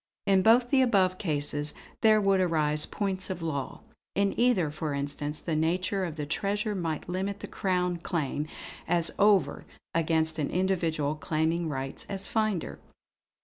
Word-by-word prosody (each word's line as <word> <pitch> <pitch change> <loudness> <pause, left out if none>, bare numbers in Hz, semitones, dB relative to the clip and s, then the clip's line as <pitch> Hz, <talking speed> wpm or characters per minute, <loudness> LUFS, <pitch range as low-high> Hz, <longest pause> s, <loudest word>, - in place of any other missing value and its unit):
In 195 -1 +4
both 240 +4 +5
the 270 -2 +5
above 190 -7 +3
cases 145 -3 -2 0.3
there 215 -1 +6
would 195 -2 +3
arise 155 -3 +1
points 190 -2 -2
of 180 -3 -4
law. 140 -5 -3 0.3
In 200 0 +2
either, 235 -11 +2
for 150 -1 -3
instance, 145 +1 -3
the 165 - -2
nature 185 +5 0
of 165 -4 -5
the 150 -2 -3
treasure 205 +7 -1
might 165 -5 -3
limit 190 +3 -3
the - - -6
Crown 180 -2 0
claim 155 -3 -2 0.4
as 170 -1 +2
over 195 -8 +3 0.3
against 160 -1 +1
an 145 - 0
individual 170 -5 0
claiming 160 +2 -1
rights 135 -2 -4
as 195 -1 -4
finder." 215 -6 -1
175 Hz, 150 wpm, -28 LUFS, 155-195 Hz, 0.4 s, there